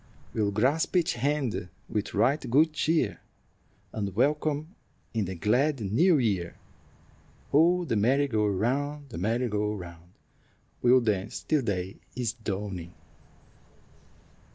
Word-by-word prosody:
We'll 105 -2 +1
grasp 130 - +1
each 175 0 +2
hand 130 -6 -1 0.2
with 105 -1 -3
right 140 0 +2
good 155 +6 +4
cheer, 155 -6 +1 0.7
And 100 -3 -3
welcome 150 - 0 0.4
in 110 -3 0
the 95 +1 -5
glad 130 - +1
new 145 - +3
year. 100 -9 0 1.0
Oh, 175 +4 +4
the 130 - -1
merry 130 +7 +3
go 110 -5 +1
round, 140 +8 -1
the 110 - -6
merry 115 +6 0
go 105 -1 -1
round, 85 -2 -10 0.7
We'll 125 +1 +5
dance 105 -3 -1
till 155 -3 +2
day 95 -5 -3 0.2
is 120 -3 -1
dawning." 95 -6 -5
115 Hz, 125 wpm, -28 LUFS, 100-145 Hz, 1.0 s, We'll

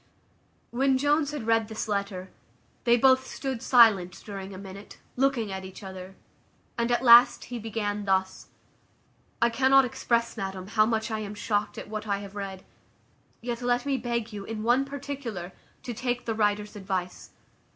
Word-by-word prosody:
When 265 +2 +2
Jones 290 +2 +2
had 295 -6 -5
read 225 -1 +2
this 220 0 -4
letter, 200 -3 -3 0.5
they 240 0 +5
both 260 +1 +4
stood 265 -4 -4
silent 215 -8 +5
during 195 -2 -7
a 190 - -8
minute, 195 +1 -10 0.2
looking 250 -5 +1
at 190 0 -5
each 190 +2 -10
other; 190 0 -9 0.6
at 240 +1 0
last 240 0 +7
he 240 - -3
began 210 -2 -3
thus: 190 -1 0 1.0
"I 235 - +4
cannot 265 +2 +5
express, 235 -1 -1
madam, 190 -1 -5
how 215 0 +3
much 225 0 -1
I 220 - -1
am 210 -1 -6
shocked 205 0 -1
at - - -7
what 215 +1 -5
I 200 -1 +1
have 200 0 -9
read; 195 -2 -6 0.8
yet 240 0 -4
let 245 +1 +1
me 280 -1 +1
beg 235 -3 -3
you, 205 -1 -6
in 215 +1 -5
one 245 +4 +3
particular, 275 -10 -6 0.3
to 245 - -4
take 245 +1 -2
the 225 - -1
writer's 210 -1 0
advice. 190 -3 -4
220 Hz, 165 wpm, -27 LUFS, 200-245 Hz, 1.0 s, last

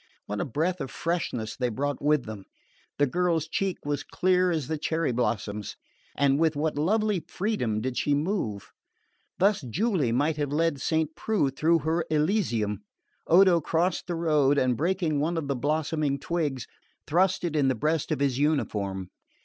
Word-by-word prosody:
What 105 0 -3
a - - -1
breath 160 +7 -1
of 135 - -4
freshness 125 -8 -2
they 125 -2 -1
brought 140 +5 -2
with 150 -2 +2
them! 105 -3 -8 0.5
The 145 - +4
girl's 165 +1 0
cheek 190 +3 -1
was 145 0 -2
clear 185 0 +2
as 155 -6 -1
the 160 -1 -2
cherry 160 -1 0
blossoms, 105 -3 -2 0.4
and 140 0 +3
with 160 -1 +2
what 155 +1 -1
lovely 210 +6 +1
freedom 175 - -1
did 130 +1 -3
she 145 - +2
move! 145 - -2 0.7
Thus 200 0 +3
Julie 155 - 0
might 145 +6 +1
have 145 -2 -2
led 155 -2 0
Saint 160 0 0
Preux 190 -9 0
through 165 +5 +2
her 165 +1 +1
"Elysium." 150 - 0 0.5
Odo 180 0 +6
crossed 170 +4 0
the 175 - -2
road 150 -4 +2
and, 130 -2 +2
breaking 165 - 0
one 165 +4 0
of 155 -3 -2
the 140 - 0
blossoming 150 +1 0
twigs, 145 -4 -2 0.4
thrust 185 +4 +2
it 170 -3 -2
in 145 -3 +3
the 130 - +2
breast 155 +6 -1
of - - -1
his 135 -2 +1
uniform. 100 - -1
150 Hz, 170 wpm, -27 LUFS, 135-170 Hz, 0.7 s, Odo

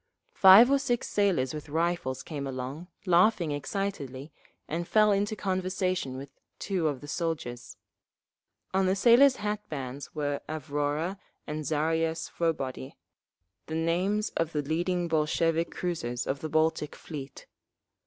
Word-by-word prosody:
Five 200 +7 +8
or 280 - +4
six 245 -3 -1
sailors 185 -11 +1
with 150 -1 -7
rifles 165 -4 -1
came 145 -4 -5
along, 135 +6 -5 0.2
laughing 180 -2 +3
excitedly, 145 -3 -4 0.4
and 170 +2 -3
fell 215 -1 +4
into 205 +2 +1
conversation 185 -7 -1
with 135 +1 -8 0.3
two 185 -5 -1
of 145 -4 -2
the 145 - -9
soldiers. 145 -7 -4 1.0
On 190 0 +2
the 190 - +2
sailors' 245 +6 +6
hat 210 -1 -2
bands 135 -1 -6
were 145 -1 -2
Avrora 150 +4 -2 0.3
and 150 -1 -4
Zaria 160 +2 +1
Svobody,—the 150 -5 -3 0.8
names 185 +6 0
of 165 0 -2
the 150 -1 -1
leading 175 +4 -1
Bolshevik 165 +1 +1
cruisers 125 -9 -3
of 135 - -2
the 155 - -5
Baltic 155 -1 +1
Fleet. 140 -4 -8
165 Hz, 130 wpm, -28 LUFS, 145-185 Hz, 1.0 s, Five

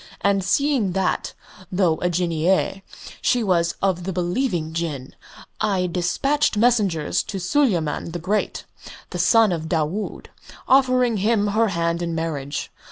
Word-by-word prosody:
And 200 -1 +2
seeing 245 -1 +1
that, 190 0 -1 0.4
though 180 -4 +2
a 180 - +1
Jinneeyeh, 175 +2 0 0.4
she 245 -2 +2
was 170 -4 +1
of 185 -3 +1
the 190 - -3
believing 175 -2 -1
Jinn, 155 -6 -4 0.5
I 195 -4 +1
despatched 210 - 0
messengers 205 -9 +2
to 195 - -6
Suleyman 180 - 0
the 170 - -4
Great, 195 +5 -2 0.5
the 180 - -4
son 210 +4 +4
of 160 -2 -3
Daood, 165 +5 -2 0.4
offering 255 -3 +3
him 205 +1 +1
her 220 +2 +2
hand 170 -2 -1
in 170 -1 -2
marriage. 150 -4 -3
185 Hz, 135 wpm, -22 LUFS, 170-215 Hz, 0.5 s, son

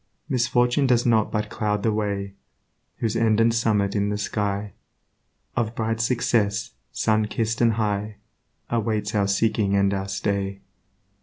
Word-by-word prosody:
Misfortune 125 0 +2
does 120 -2 +3
but 105 -2 +1
cloud 105 -1 -1
the 115 - +2
way 100 -2 -2 0.6
Whose 115 -1 -1
end 115 -1 +2
and 115 0 +4
summit 105 -4 +1
in 100 0 +1
the 105 - -1
sky 105 -1 -2 0.8
Of 115 -1 -1
bright 115 0 -1
success, 115 -3 +1 0.2
sunkiss'd 110 +1 0
and 115 -1 +4
high, 105 -1 -1 0.6
Awaits 110 -2 -1
our 100 -2 +2
seeking 100 0 +1
and 100 0 +3
our 95 0 -2
stay. 100 0 -2
105 Hz, 135 wpm, -24 LUFS, 100-115 Hz, 0.8 s, and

